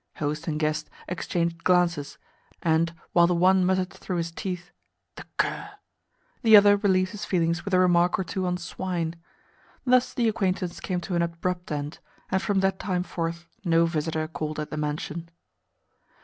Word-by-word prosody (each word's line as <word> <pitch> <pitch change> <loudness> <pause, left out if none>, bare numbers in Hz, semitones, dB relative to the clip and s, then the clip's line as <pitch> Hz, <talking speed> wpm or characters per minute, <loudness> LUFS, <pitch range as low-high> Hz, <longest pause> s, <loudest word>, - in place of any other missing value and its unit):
Host 150 +2 -3
and 155 -2 -1
guest 155 0 -1 0.2
exchanged 170 -1 -2
glances, 175 -5 +2 0.5
and, 165 0 +2 0.2
while 170 -1 +6
the 175 - +1
one 185 +2 +4
muttered 185 0 +1
through 180 - -4
his 170 0 -2
teeth 180 0 -5 0.4
"The - - -9
cur!" - - -1 0.7
the 220 -2 +8
other 205 0 +7
relieved 185 -2 +2
his 210 0 -7
feelings 170 -2 0
with 200 - -5
a - - +5
remark 175 -1 +4
or 190 - -1
two 185 +1 -2
on 180 0 0
swine. 170 -2 -3 0.7
Thus 255 0 +3
the 235 -2 +2
acquaintance 190 -5 -1
came 180 -2 -2
to 180 - -5
an 170 - +2
abrupt 175 +1 -2
end, 145 +1 -4 0.3
and 190 - +2
from 200 -1 +1
that 190 0 +1
time 180 -2 -1
forth 170 -1 -4 0.2
no 165 -2 +4
visitor 160 -1 -1
called 155 -1 -4
at 150 - -4
the - - -3
mansion. 150 +2 -3
175 Hz, 170 wpm, -26 LUFS, 165-185 Hz, 0.7 s, the